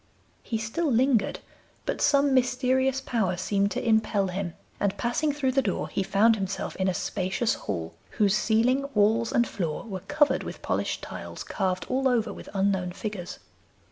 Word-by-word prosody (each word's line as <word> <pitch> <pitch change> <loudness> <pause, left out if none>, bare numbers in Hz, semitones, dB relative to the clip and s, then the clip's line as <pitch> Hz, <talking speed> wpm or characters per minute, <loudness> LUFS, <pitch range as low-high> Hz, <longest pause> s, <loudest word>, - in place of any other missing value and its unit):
He 225 - -3
still 245 +9 -1
lingered, 240 -3 +2 0.4
but - - -2
some 280 -1 +4
mysterious 260 +1 +2
power 215 -9 0
seemed 200 +1 +1
to 235 - -3
impel 220 -3 +2
him, 180 -2 -4 0.2
and 200 -1 0
passing 250 +6 0
through 280 -2 0
the 270 +1 +3
door - - -2
he - - -1
found 210 +4 +4
himself 195 -2 -3
in 190 - +1
a 185 - +2
spacious 190 +5 -1
hall, 85 -5 -4 0.2
whose 205 -3 +4
ceiling, 250 +6 +2
walls, 220 +3 +3
and 235 -1 +3
floor 165 -2 -3
were 200 -6 -5
covered 290 +6 +2
with - - -8
polished - - -1
tiles - - -7
carved 185 -1 -2
all 265 +1 +1
over 235 -4 +1
with - - -10
unknown 190 -2 +1
figures. 195 -2 -5
220 Hz, 170 wpm, -27 LUFS, 195-255 Hz, 0.4 s, some